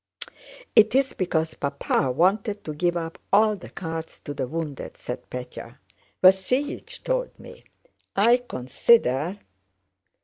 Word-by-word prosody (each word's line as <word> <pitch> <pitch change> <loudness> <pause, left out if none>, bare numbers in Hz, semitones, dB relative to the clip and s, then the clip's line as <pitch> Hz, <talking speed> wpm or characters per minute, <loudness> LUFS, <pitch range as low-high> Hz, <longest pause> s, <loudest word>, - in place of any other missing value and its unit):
"It's 255 +5 +5
because 160 -3 -1
Papa 140 -1 -1
wanted 200 - +1
to 155 - -5
give 175 +3 0
up 165 -1 -5
all 215 +1 +5
the - - -11
carts 165 -2 -6
to 145 - -6
the 135 - -3
wounded," 155 -1 -5
said 125 +1 -7
Pétya. 125 0 -8 0.5
"Vasílich 220 - +2
told - - -2
me. - - -13 0.5
I 230 +5 +5
consider..." 165 - +1
175 Hz, 115 wpm, -25 LUFS, 145-215 Hz, 0.5 s, It's